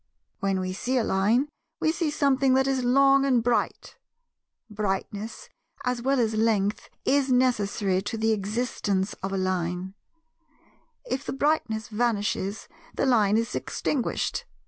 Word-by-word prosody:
When 195 -3 0
we 185 0 -3
see 255 +7 -1
a 240 - +2
Line, 215 +8 +2 0.3
we 315 - +2
see 330 -1 -1
something 270 -2 +2
that 265 0 +3
is 265 -2 0
long 275 +2 +5
and 255 -4 +2
bright; 240 0 -1 0.7
brightness, 210 0 -4 0.4
as 250 -1 -1
well 270 +2 +1
as 225 -2 +1
length, 215 -2 +1 0.2
is 275 -1 +2
necessary 210 -6 +2
to 205 +3 -4
the 220 0 +1
existence 205 -2 -1
of 195 +1 -3
a 195 - -1
Line; 185 0 -2 1.1
if 280 - -3
the - - -4
brightness 270 -6 0
vanishes, 210 -3 -1 0.3
the - - +1
Line 215 -5 +4
is 230 +1 -1
extinguished. 265 -5 -2
225 Hz, 140 wpm, -26 LUFS, 200-260 Hz, 1.1 s, long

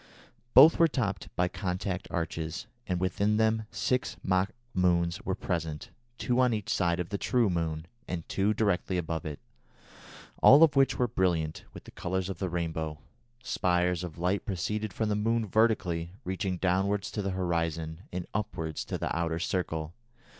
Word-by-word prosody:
Both 150 +5 +9
were 165 - +7
topped 100 - -2
by 90 - +2
contact 90 0 -3
arches, 80 -1 -3 0.2
and 90 -1 0
within 100 +3 +1
them 110 0 +2
six 125 +6 -1
mock 95 +1 +2 0.2
moons 85 -1 +2
were 95 - -1
present, 80 -6 -3 0.3
two 125 +2 0
on 125 -3 +4
each 105 -1 -4
side 85 -1 +1
of 90 - -3
the 100 -1 -3
true 120 -6 +2
moon, 80 -2 -2 0.2
and 85 -2 -4
two 100 +2 +1
directly 100 -4 0
above 80 -2 -3
it, 75 -1 -6 1.0
all 145 +4 +9
of 155 -3 +5
which 135 0 +4
were 125 - +2
brilliant 85 -7 0
with - - -11
the - - -13
colours 95 +1 -2
of 90 - -7
the 95 - -1
rainbow. 80 -2 -3 0.5
Spires 90 -4 +1
of 85 -3 -7
light 90 +4 0
proceeded 105 +2 -2
from 110 +3 -1
the 105 - +1
moon 115 +2 +1
vertically, 90 -6 +1
reaching 95 0 -2
downwards 95 +2 0
to 105 - -2
the 100 - -2
horizon, 85 -3 -1
and 90 -1 -4
upwards 80 -7 -3
to - - -3
the - - -2
outer 85 -1 0
circle. 80 -3 -2
90 Hz, 170 wpm, -29 LUFS, 85-105 Hz, 1.0 s, Both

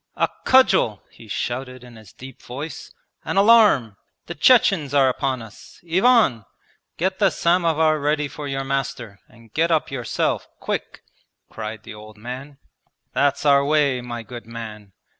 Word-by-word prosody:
'A - - +1 0.2
cudgel!' 190 - +4
he 115 - -16
shouted 125 +3 -4
in 120 -1 -14
his 110 -4 -15
deep 130 -1 -13
voice. 140 +4 -8 0.3
'An - - -3
alarm! 200 - +5 0.3
The 170 - -6
Chechens 170 - +3
are 135 -2 +5
upon 130 -2 -2
us! 110 -2 -15
Ivan! 185 - +3 0.5
get 190 +2 -1
the 195 - +4
samovar 165 -3 +2
ready 150 +1 0
for 145 +1 -8
your 135 -1 -3
master, 135 -6 -4
and 115 -1 -20
get 165 +2 +1
up 160 -4 0
yourself 125 -3 -2
quick,' - - -5 0.5
cried 110 -1 -7
the - - -10
old 105 0 -13
man. 130 +5 -8 0.6
'That's 140 +1 +1
our 140 -1 +5
way, 140 -3 +1
my 120 -1 -6
good 120 -1 -10
man! 110 -3 -9
135 Hz, 150 wpm, -22 LUFS, 115-155 Hz, 0.6 s, alarm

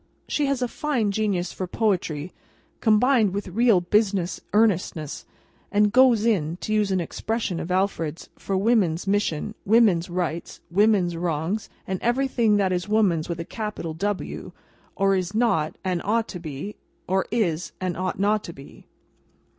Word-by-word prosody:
She 295 -2 0
has 275 -2 0
a - - +1
fine 240 -6 -1
genius 200 -4 -1
for 185 - -4
poetry, 180 -6 -1 0.5
combined 220 -2 +3
with 200 -1 -3
real 220 -1 +4
business 195 -1 +1
earnestness, 185 -8 0 0.4
and 210 0 +3
"goes 245 -3 +5
in"—to 180 -2 0
use 210 -2 +2
an 190 -1 +1
expression 190 +1 -2
of 165 - -5
Alfred's—for 185 0 -2
Woman's 195 -6 +2
mission, 200 -2 0
Woman's 200 -6 +4
rights, 175 -2 -3
Woman's 195 -3 +3
wrongs, 170 +4 -2 0.2
and 190 -1 -3
everything 240 -3 +2
that 190 -2 +1
is 180 +3 -2
woman's 190 -8 +2
with 170 -1 -3
a 165 - -4
capital 210 -7 -5
W, 200 +4 -3 0.4
or 195 0 +3
is 185 +2 -2
not 215 -10 +1
and 180 -2 -1
ought 225 +2 +1
to 180 - -6
be, 160 +5 -7 0.3
or 190 +1 +1
is 180 -7 -1
and 185 -2 -2
ought 185 +1 -2
not 210 +1 +2
to 170 - -7
be. 135 -2 -14
195 Hz, 150 wpm, -24 LUFS, 175-215 Hz, 0.5 s, goes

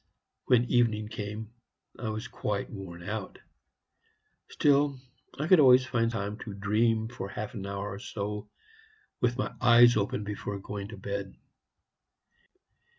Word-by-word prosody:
When 120 -2 +4
evening 110 -4 +2
came, 110 0 -6 0.5
I 120 - -3
was 110 +3 -4
quite 100 -4 -3
worn 90 -4 -8
out; 105 -3 -4 1.1
still, 140 -1 +3 0.4
I 150 - -1
could 185 -1 +7
always 130 -2 +7
find 115 -3 +1
time 105 -1 -4
to 105 -3 -7
dream 110 +2 +1
for 115 -4 -6
half 105 +1 -5
an 100 -4 -5
hour 100 +1 -4
or 100 - -7
so 105 0 -5 0.7
with 120 0 +1
my 130 - -2
eyes 120 0 +7
open 105 0 0
before 105 0 -4
going 100 0 -6
to 110 0 -9
bed. 100 0 -5
110 Hz, 140 wpm, -29 LUFS, 100-120 Hz, 1.1 s, could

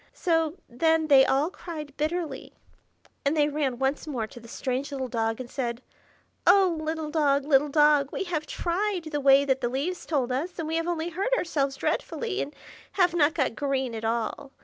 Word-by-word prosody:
So 325 -2 +1
then 320 +5 +1
they 270 -2 +7
all 285 +6 +2
cried 305 -7 -8
bitterly, 320 +2 -3 0.7
and 285 +3 +1
they 295 0 +3
ran 285 -4 -1
once 270 +4 -1
more 250 -7 -2
to 240 - -12
the 235 - -14
strange 260 +4 -3
little 265 -2 -3
dog, 225 -1 -1
and 255 - -6
said, 240 -1 -4 0.6
"Oh, 380 -4 +6
little 315 -1 -3
dog, 285 -3 +2
little 290 0 +3
dog! 295 -1 +4
we - - -2
have 325 -5 -3
tried 370 +1 -1
the 295 -1 -1
way 275 0 +6
that 265 -1 +1
the 240 - 0
leaves 295 +9 -3
told 265 -6 0
us, 305 +8 -3
and 325 -2 -3
we 325 +1 -1
have 330 +1 -1
only 340 -1 -1
hurt 395 +9 0
ourselves 280 - -1
dreadfully, 425 - -2
and 290 - -5 0.4
have 360 -3 +3
not 320 -1 +3
got 265 -7 0
green 265 -2 -1
at 225 0 -5
all. 235 +5 -2
295 Hz, 195 wpm, -27 LUFS, 265-330 Hz, 0.7 s, they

